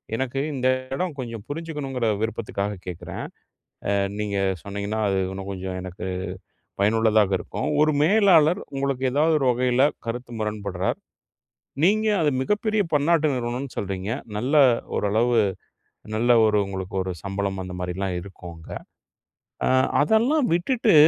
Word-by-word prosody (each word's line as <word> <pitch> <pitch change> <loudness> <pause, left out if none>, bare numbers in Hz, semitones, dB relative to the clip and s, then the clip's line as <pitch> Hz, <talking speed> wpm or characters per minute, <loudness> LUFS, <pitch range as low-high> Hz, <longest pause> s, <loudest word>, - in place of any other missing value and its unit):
எனக்கு 130 +2 -2 0.2
இந்த 130 0 0 0.3
இடோ 180 +7 0
கொஞ்சம் 115 -4 -5
புரிஞ்சிக்கணுங்கிற 145 -6 -3
விருப்பத்துக்காக 105 -2 -2
கேட்குறேன். 90 -1 -6 0.7
அ - - +2 0.3
நீங்க 105 -1 -1 0.2
சொன்னீங்கன்னா, 100 +2 -3
அது 95 -1 +1
இன்னும் 95 0 -6
கொஞ்சம் 95 -1 -4
எனக்கு 90 0 -7 0.7
பயனுள்ளதாக 110 -1 +3
இருக்கும். 100 - -4
ஒரு 155 - +4
மேலாளர் 180 -2 +5 0.2
உங்களுக்கு 135 -1 -1
ஏதாவது 155 +4 +3
ஒரு 135 - 0
வகையில 125 +1 +2 0.2
கருத்து 120 +1 -5
முரண்பட்றார். 100 -3 -2 0.9
நீங்க 215 +4 +4
அது 150 - +3
மிகப்பெரிய 210 +7 +1
பன்னாட்டு 155 +2 +3
நிறுவனம்னு 125 +2 -3
சொல்றீங்க. 95 +1 -3 0.3
நல்ல 130 +7 0 0.4
ஓரளவு 115 +4 +2 0.8
நல்ல 120 +3 +1 0.2
ஒரு 105 -1 +2
உங்களுக்கு 95 0 -5
ஒரு 95 0 -3
சம்பளம் 100 -1 -2
அந்த 90 0 -7
மாதிரிலாம் 90 +1 -2
இருக்கும் 90 -2 -10
அங்க. 80 - -14 1.0
அ - - +4 0.3
அதெல்லாம் 240 - +3
விட்டுட்டு, 220 +2 +2
115 Hz, 125 wpm, -24 LUFS, 100-150 Hz, 1.0 s, மேலாளர்